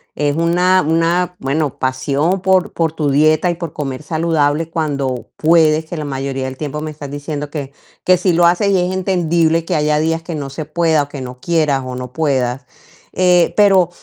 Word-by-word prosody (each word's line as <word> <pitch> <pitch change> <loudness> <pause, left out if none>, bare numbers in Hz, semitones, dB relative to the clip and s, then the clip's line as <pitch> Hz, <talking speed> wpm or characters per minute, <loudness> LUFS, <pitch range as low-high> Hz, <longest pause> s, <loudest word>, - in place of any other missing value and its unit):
Es 145 0 0
una 180 +3 +3
una 170 +3 +1
bueno, 140 +1 -1
pasión 140 +7 0
por 190 -1 +2
por 165 -2 0
tu 150 -2 -1
dieta 155 +5 +3
y - - -4
por 170 -3 -6
comer 135 -2 -4
saludable 160 -1 0
cuando 140 -7 -2
puedes, 160 -1 +3
que 175 - -7
la 155 - -4
mayoría 135 -1 -3
del 130 0 -6
tiempo 150 0 -4
me 155 - -4
estás 145 -2 -9
diciendo 145 0 -5
que 140 -3 -5 0.3
que 185 0 +4
sí 180 0 +1
lo 170 +1 +4
haces, 180 +4 +2
y 190 - +3
es 180 - -1
entendible 170 -3 +1
que 170 +1 -2
haya 150 0 +1
días 165 +1 0
que 170 - -6
no 140 -2 -5
se 150 +3 -6
pueda, 160 -1 +1
o - - -8
que 140 -2 -7
no 125 0 -8
quieras, 150 -3 0
o 125 0 -5
no 125 0 -7
puedas, 130 -4 -1 0.5
eh, 180 -1 +3
pero 195 -4 +5
155 Hz, 200 wpm, -17 LUFS, 145-170 Hz, 0.5 s, pero